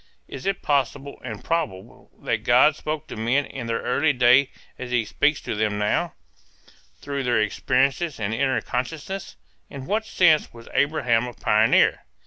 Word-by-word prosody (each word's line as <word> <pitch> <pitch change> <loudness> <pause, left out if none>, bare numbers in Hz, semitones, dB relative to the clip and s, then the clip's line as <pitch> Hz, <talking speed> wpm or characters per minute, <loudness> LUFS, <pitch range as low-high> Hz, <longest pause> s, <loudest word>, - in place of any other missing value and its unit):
Is 135 - -7
it 195 -1 -2
possible 140 0 -1
and 110 -4 -7
probable 155 - -4
that - - -1
God 130 +5 +5
spoke 155 -1 -4
to - - -8
men 120 +6 0
in 125 -3 -7
that 115 - -1
early 145 +6 +1
day 125 +2 +4 0.3
as 125 - -6
he 120 -3 +1
speaks 145 +7 +1
to - - -4
them 105 -1 -1
now, 105 0 -1 0.9
through 140 -1 -3
their 120 -3 +1
experiences 135 +8 0
and 105 0 -2
inner 130 +2 0
consciousness? 160 +10 -5 0.3
In 135 -2 -8
what 220 +7 -1
sense 160 -4 +3
was 115 -1 -14
Abraham 125 -5 +1
a 120 - -8
pioneer? 110 +1 +3
130 Hz, 160 wpm, -23 LUFS, 115-150 Hz, 0.9 s, God